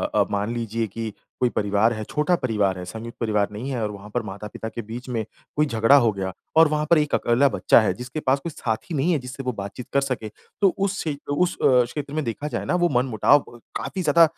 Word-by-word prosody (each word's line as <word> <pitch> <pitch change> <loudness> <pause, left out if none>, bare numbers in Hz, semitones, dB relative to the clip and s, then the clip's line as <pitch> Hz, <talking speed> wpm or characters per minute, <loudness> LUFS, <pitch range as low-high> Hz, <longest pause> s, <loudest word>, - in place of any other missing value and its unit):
अ, - - +4
मान 105 +3 -1
लीजिए 115 -1 -2
कि 110 +2 -5 0.3
कोई 125 - +3
परिवार 105 +3 +2
है, 110 0 -4
छोटा 150 +4 +2
परिवार 105 - 0
है, 90 - -6
संयुक्त 115 +5 -8
परिवार 105 -3 +1
नहीं 115 +6 -5
है 120 -3 -2
और 105 - -1
वहाँ 100 +1 -10
पर 120 - +1
माता-पिता 105 +2 -6
के 115 - -5
बीच 115 +4 -8
में 115 -3 -1 0.3
कोई 150 +1 +3
झगड़ा 115 +1 +4
हो 120 -6 +5
गया 95 -1 -3 0.3
और 160 -1 +8
वहाँ 150 0 0
पर 170 - +6
एक 150 -1 0
अकेला 120 +4 +3
बच्चा 110 - +4
है, 110 - +1
जिसके 125 +5 -6
पास 135 -1 +2
कोई 170 - -4
साथी 115 +4 -3
नहीं 150 +6 +2
है 155 - +2
जिससे 130 +1 -7
वो 125 - -1
बातचीत 100 +5 -7
कर 140 - +4
सके, 130 -5 -2 0.3
तो 195 - +6
उस 195 0 0
क्षे 155 -3 -2 0.2
उस 180 +4 +1
अ, 125 -2 +5
क्षेत्र 140 +4 -6
में 155 0 -1
देखा 120 +6 -3
जाए - - -3
ना - - +1
वो 175 -1 +3
मन-मुटाव 125 +2 +3
ब 120 - -14 0.2
काफ़ी 190 - -4
ज़्यादा 165 0 +5
120 Hz, 240 wpm, -24 LUFS, 110-145 Hz, 0.3 s, और